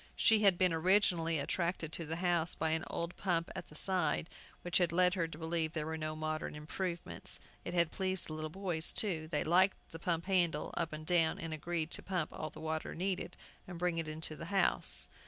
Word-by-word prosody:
She 220 -1 +5
had 195 -4 +5
been 185 -2 +4
originally 165 -1 +3
attracted 170 +2 -1
to 165 -2 -4
the 160 - -2
house 175 -1 +1
by 160 -1 0
an 160 +1 0
old 170 +1 -3
pump 170 -4 0
at - - -6
the 150 - -15
side, 170 -2 +1 0.3
which 175 0 +3
had 175 -3 +2
led 180 +1 +4
her 170 -3 0
to 160 - -9
believe 160 -1 -1
there 155 -2 -2
were 160 +1 -3
no 155 0 -3
modern 155 -1 -3
improvements. 170 +3 -2 0.2
It 175 - -4
had 170 -2 +3
pleased 190 -1 -2
the 155 - -6
little 155 0 -4
boys, 175 -2 0
too. 165 -7 0
They 150 -2 0
liked 185 +4 +4
to 165 - -8
pump 170 -1 -1
the 195 - -2
handle 170 -5 +2
up 165 -1 -1
and 155 0 -6
down, 165 -2 +3
and 165 -1 -4
agreed 165 +1 -2
to - - 0
pump 180 -4 -2
all 155 - -4
the - - -12
water 160 0 -3
needed, 180 -1 -2 0.3
and 180 -1 -7
bring 175 -1 0
it 165 - -3
into 155 0 -4
the - - -7
house. 195 +2 +3
165 Hz, 220 wpm, -34 LUFS, 160-180 Hz, 0.3 s, She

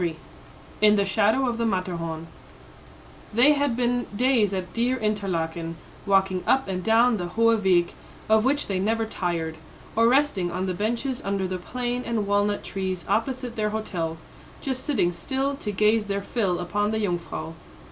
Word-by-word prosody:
XXIII 165 -2 -1 0.6
IN 210 0 +6
THE 200 -1 +2
SHADOW 220 +6 +2
OF 235 -1 -1
THE 230 - +1
MATTERHORN 170 -5 -2 1.1
They 265 +6 +7
had 285 -5 0
been 245 0 0
days 245 -3 +3
at 185 -2 -4
dear 245 +2 +1
Interlaken, 170 -7 -2 0.3
walking 190 -2 +2
up 265 -3 +3
and 185 -1 -3
down 225 +2 +4
the 175 -2 -3
Hoheweg, 190 -4 +3 0.3
of 220 0 +4
which 285 +3 +1
they 195 -2 -2
never 225 +3 +1
tired, 170 -6 -3 0.4
or 230 +1 +5
resting 250 -9 +2
on 185 +2 -2
the 185 - -1
benches 235 +7 -2
under 195 -1 -1
the 185 0 -3
plane 245 +5 -3
and 230 -4 -1
walnut 205 0 +1
trees 185 -2 -4
opposite 250 +1 -1
their 215 -1 0
hotel, 175 -7 -3 0.4
just 260 -2 -3
sitting 190 -12 +1
still 265 +11 -1
to 210 -8 -4
gaze 210 +2 +2
their 200 0 -2
fill 195 -6 0
upon 205 +4 -1
the 220 - -1
Jungfrau. 170 -3 -3
210 Hz, 165 wpm, -25 LUFS, 185-235 Hz, 1.1 s, They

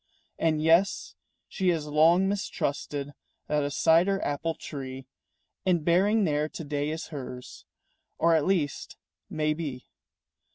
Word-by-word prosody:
And 155 -2 +1
yes, 165 +5 +3 0.3
she 190 - -2
has 165 -4 0
long 160 +5 +4
mistrusted 145 -7 -3 0.3
That 150 0 0
a 145 - -1
cider 170 +7 +3
apple 160 +3 -2
tree 135 -2 -7 0.6
In 175 -4 +2
bearing 200 +6 +3
there 150 -3 0
to 165 - -7
day 145 0 -2
is 160 +1 -5
hers, 130 -4 -8 0.5
Or 170 0 +3
at 160 -1 +2
least 170 -7 -1 0.3
may 155 0 0
be. 145 -6 -6
155 Hz, 130 wpm, -27 LUFS, 145-170 Hz, 0.6 s, long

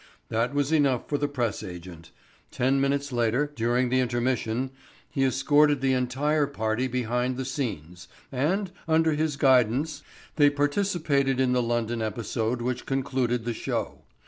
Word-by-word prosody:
That 115 +4 0
was 145 +1 +1
enough 140 -6 +2
for 145 - -1
the 145 - +1
press 120 -7 -2
agent. 85 -2 -9 0.4
Ten 135 +2 +1
minutes 140 +1 0
later, 125 +5 0
during 120 +2 +1
the 130 +1 +2
intermission, 125 0 -1 0.4
he 135 -3 -1
escorted 145 +2 +3
the 135 0 +1
entire 140 +4 +1
party 110 -2 -1
behind 125 0 -1
the 130 - -3
scenes, 100 - -5 0.2
and, 175 +9 0 0.2
under 160 0 +3
his 155 -1 -1
guidance, 135 +3 +3 0.4
they 145 -2 +6
participated 145 -3 0
in 130 -1 +2
the 125 - +2
London 120 -1 -1
episode 115 +2 -2
which 125 0 -3
concluded 130 -3 -1
the 120 - -1
show. - - -3
130 Hz, 145 wpm, -26 LUFS, 120-145 Hz, 0.4 s, they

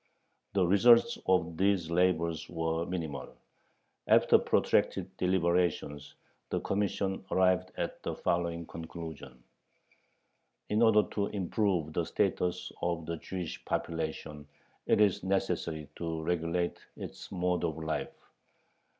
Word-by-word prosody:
The 95 -2 +3
results 120 - +5
of 85 -3 +2
these 95 -3 +2
labors 85 -2 +1
were 80 0 -1
minimal. 80 -7 -5 0.7
After - - +6
protracted - - +1
deliberations 85 -5 0 0.3
the - - 0
Commission 100 -1 -1
arrived 95 0 +3
at - - -3
the - - -3
following 85 -1 -1
conclusion: 80 -6 -8 1.3
In 105 +2 +2
order 110 -2 +6
to 100 -1 0
improve 95 -4 0
the - - +1
status 90 0 -1
of 85 -2 -1
the 85 +1 -3
Jewish 90 0 -6
population, 80 -2 -3 0.4
it - - +4
is 105 -4 +3
necessary 90 -5 -1
to 80 -2 -3
regulate 85 +1 -1 0.2
its - - -8
mode 90 -2 0
of 80 -2 -1
life. 80 0 -2
85 Hz, 115 wpm, -31 LUFS, 80-95 Hz, 1.3 s, After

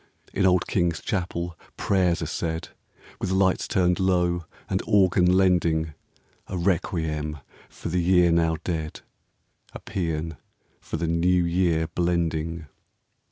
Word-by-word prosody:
In 95 -1 +3
old 90 -1 +3
King's 85 -3 0
Chapel 85 -3 -3 0.2
prayers 90 -4 +1
are - - -2
said, 80 -1 -3 0.5
With - - -2
lights 95 0 +2
turned 90 -1 +2
low 90 -2 +1 0.2
and - - -1
organ 95 -3 +4
lending 85 -4 +2 0.5
A 95 - -4
requiem 80 -4 -1 0.3
for - - -7
the 90 +1 +1
year 90 -1 +4
now 80 -1 +2
dead, 80 -3 -3 0.7
A - - -7
psean 80 -3 -3 0.4
for - - -5
the 85 - -2
New 85 +2 +2
Year 85 -2 +1
blending. 85 -1 -1
85 Hz, 125 wpm, -25 LUFS, 80-90 Hz, 0.7 s, organ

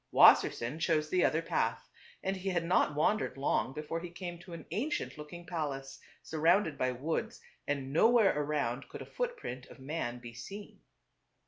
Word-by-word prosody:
Wassersein 125 +7 +6
chose 155 -2 +1
the 180 -1 +3
other 160 +1 +2
path; 115 -7 -1 0.4
and 190 +1 0
he 190 +1 -3
had 175 -3 0
not 165 -4 +3
wandered 155 -1 +1
long 135 -1 +1
before 150 +3 -4
he 175 +1 -7
came 175 0 -6
to 175 0 -11
an 170 - -8
ancient 250 - -2
looking 155 +3 -9
palace 145 -6 -4 0.2
surrounded 160 +1 +2
by 130 -2 0
woods, 140 +6 -3 0.3
and 140 -2 -2
nowhere 225 +4 +5
around 145 -4 -1
could - - -7
a - - -12
footprint 475 - -4
of - - -13
man 135 -3 -3
be 120 -1 -10
seen. 200 - -9
160 Hz, 165 wpm, -32 LUFS, 135-180 Hz, 0.4 s, Wassersein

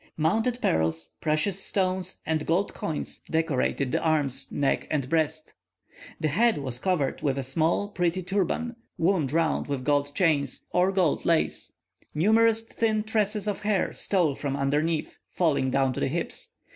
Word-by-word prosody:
Mounted 220 +10 +1
pearls, 80 0 0
precious 160 +5 +1
stones, 185 -1 -1
and 155 -1 -1
gold 180 +5 +1
coins, 155 -2 -4
decorated 145 -4 0
the - - 0
arms, 145 -5 0
neck, 140 -1 0
and 140 -4 -1
breast. 155 +1 -1 0.7
The 155 - +1
head 225 +9 +3
was 130 -4 -3
covered 160 -5 0
with 140 -2 0
a 135 - -1
small, 160 +9 +1
pretty 180 -1 -1
turban, 205 +6 -1 0.2
wound 165 -6 +1
round 165 0 +1
with 140 -3 -3
gold 145 0 +1
chains, 150 -7 +1
or 180 +2 +3
gold 185 -6 +1
lace; 165 -1 0 0.4
numerous 225 +6 +4
thin 220 -1 0
tresses 215 -1 0
of 205 - -1
hair 205 -2 0
stole 175 -7 +1
from 140 0 -3
underneath, 150 +3 -1
falling 150 -6 +1
down 135 0 +2
to - - -4
the - - +1
hips. 165 +5 -4
160 Hz, 155 wpm, -27 LUFS, 140-195 Hz, 0.7 s, numerous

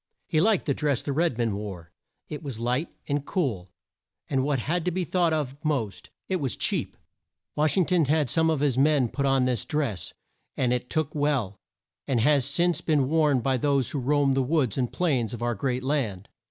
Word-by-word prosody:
He 155 -3 +1
liked 210 0 +3
the 140 - +1
dress 145 -3 -1
the 145 - -3
red 160 -4 +1
men 115 -4 0
wore. 95 -5 -7 0.4
It 150 - -6
was 140 -7 -6
light 125 +7 -1 0.2
and 145 -1 -1
cool, 125 - -2 0.6
and, 135 -2 0
what 140 0 +1
had 165 +8 -1
to - - +2
be 180 +1 -1
thought 175 0 +1
of 145 -4 -1
most, 135 -10 -2 0.2
it 190 - 0
was 135 -7 -2
cheap. - - -1 0.6
Wash 150 +1 +2
ing 185 - +4
ton 175 -3 +2
had 150 0 +2
some 160 +6 +2
of 155 -3 0
his 135 -3 +2
men 140 -4 +3
put 140 +3 -1
on 135 -1 +3
this 125 -3 0
dress, 135 - -2 0.5
and 125 -2 +2
it 125 0 -3
took 155 -2 -1
well, 140 -9 0 0.5
and 130 -4 +1
has 140 +2 +3
since 170 +3 +1
been 145 -6 +1
worn 150 -5 +3
by 130 +2 +1
those 140 -1 +1
who 145 - -2
roam 140 +1 +2
the 135 - +2
woods 130 -4 +1
and 125 -3 -1
plains 130 - 0
of 120 - -7
our 120 0 +1
great 125 +3 -2
land. 120 -9 -2
140 Hz, 205 wpm, -26 LUFS, 125-155 Hz, 0.6 s, ing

